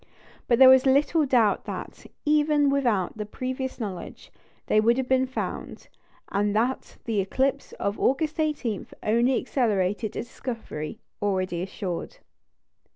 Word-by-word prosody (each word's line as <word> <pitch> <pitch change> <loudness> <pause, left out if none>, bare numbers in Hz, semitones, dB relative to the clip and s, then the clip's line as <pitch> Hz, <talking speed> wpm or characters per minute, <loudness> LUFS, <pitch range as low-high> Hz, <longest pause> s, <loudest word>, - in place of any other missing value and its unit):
But 235 - +4
there 260 +1 +9
is 260 +1 +4
little 290 +3 +3
doubt 235 -6 +3
that, - - -7 0.2
even 295 -1 +3
without 240 -10 +1
that 210 0 -6
previous 260 +1 -4
knowledge, 190 -6 -7 0.3
they 215 - +3
would 235 +3 +3
have 260 -1 -1
been 260 0 +2
found; 260 - -5 0.4
and 205 +1 0
that 245 +4 -1
the 225 -3 0
eclipse 265 +8 0
of 200 +1 -3
August 300 +4 +1
18 285 -9 -1 0.2
only 235 +4 +3
accelerated 210 -5 0
a - - -2
discovery 230 - -6 0.2
already 185 -4 -1
assured. 185 -1 -5
240 Hz, 135 wpm, -26 LUFS, 205-265 Hz, 0.4 s, there